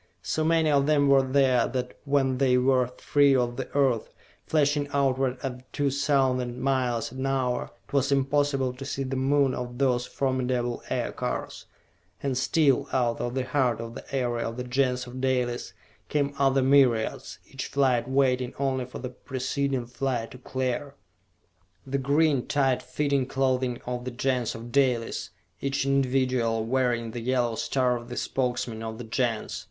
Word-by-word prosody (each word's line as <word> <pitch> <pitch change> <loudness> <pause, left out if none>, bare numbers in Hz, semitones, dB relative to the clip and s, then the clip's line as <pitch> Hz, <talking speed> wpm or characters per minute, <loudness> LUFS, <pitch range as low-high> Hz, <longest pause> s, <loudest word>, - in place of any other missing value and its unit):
So 155 - -1
many 160 -1 +3
of 140 -1 +3
them 145 -2 +3
were 135 -1 +6
there 130 -2 +3
that 125 -1 -4
when 135 -2 +1
they 130 -2 +4
were 130 -1 +3
free 145 -1 +4
of 120 -1 +1
the 130 0 -5
Earth, 130 -6 +2 0.4
flashing 145 -1 +2
outward 135 -2 +1
at 130 -1 -6
two 145 -1 0
thousand 130 -3 +1
miles 125 -4 0
an 130 +1 -3
hour, 130 -2 0 0.2
it - - -20
was 140 0 +2
impossible 135 -1 +1
to 130 +2 -9
see 135 0 -3
the 135 0 -3
Moon 135 0 +2
or 125 -1 -4
those 125 -1 0
formidable 125 -2 -1
Aircars - - -3 0.6
and 135 -2 0
still, 140 +1 +2
out 120 -3 +1
of 120 +1 -3
the 130 -1 -1
heart 130 -4 +1
of 115 0 -6
the - - -8
area 120 -3 0
of 115 +1 -6
the 125 - -3
Gens 125 0 0
of 125 +1 -8
Dalis, 125 -2 -1 0.4
came 145 -1 0
other 135 -1 +3
myriads, 130 -5 +2
each 135 -1 -6
flight 130 -3 +1
waiting 130 -2 +1
only 130 -2 0
for 125 - -9
the 125 - -5
preceding 130 0 -2
flight 120 -1 -3
to 125 - -11
clear! 130 +2 -3 0.9
The 135 +1 -1
green, 140 0 +2
tight 135 -3 +2
fitting 140 0 0
clothing 130 -2 0
of 125 0 -4
the - - -2
Gens 125 -1 -1
of 115 +1 -8
Dalis, 125 -4 +1 0.3
each 140 -1 -1
individual 130 -4 +1
wearing 120 -2 0
the 120 - -5
yellow 120 -1 +1
star 125 +2 +1
of 120 0 -7
the 120 - -6
Spokesman 120 -3 -2
of 110 0 -5
the 120 - -6
Gens! 115 -1 -2
130 Hz, 165 wpm, -27 LUFS, 125-135 Hz, 0.9 s, were